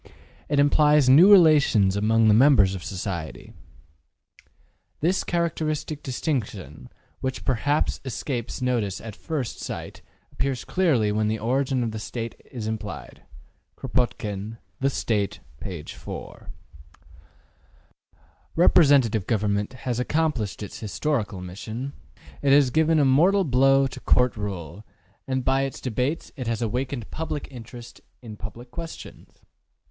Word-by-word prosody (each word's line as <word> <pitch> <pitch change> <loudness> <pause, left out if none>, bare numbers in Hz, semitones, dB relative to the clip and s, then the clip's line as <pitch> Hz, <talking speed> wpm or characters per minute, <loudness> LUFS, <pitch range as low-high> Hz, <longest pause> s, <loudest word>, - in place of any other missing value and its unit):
It 145 - +1
implies 150 0 +4
new 165 +10 +8
relations 150 - +6
among 110 +2 +3
the 105 - +6
members 110 -5 +5
of 95 -2 -6
society. 90 -5 -5 1.5
``This 180 +5 +1
characteristic 155 -3 -2
distinction, 105 - -4 0.3
which 130 -1 -4
perhaps 145 +4 0
escapes 130 -1 -4
notice 115 -6 0
at 110 -2 -9
first 140 -5 -4
sight, - - -7 0.3
appears 130 0 -2
clearly 140 - +2
when 105 +1 0
the 110 +1 0
origin 130 +3 0
of 115 - -2
the 110 - -5
State 115 +1 -5 0.2
is 120 -4 -6
studied.'' 110 0 -6 0.6
Kropotkin, 115 -4 -2 0.2
``The 135 - +3
State.'' 105 -6 -1 0.2
p. 90 -6 -6
4. - - -9 2.1
Representative 140 - +4
government 105 -1 0
has 125 -2 -1
accomplished 125 -7 -1
its 105 - -8
historical 105 - -2
mission; 110 +9 -6 0.5
it 140 - +2
has 140 -2 +5
given 160 +3 +3
a 145 - +4
mortal 175 +10 +4
blow 135 -1 +4
to 135 - -5
Court 125 0 +2
rule; 100 -3 -6 0.4
and 130 -1 -2
by 135 +1 +2
its 135 -1 -3
debates 125 +6 -2
it 130 -6 -5
has 115 0 -1
awakened 125 +1 -3
public 155 -2 -4
interest 120 -1 -11 0.2
in 110 -3 -8
public 115 +4 -10
questions. 165 -1 -10
125 Hz, 125 wpm, -25 LUFS, 105-145 Hz, 2.1 s, new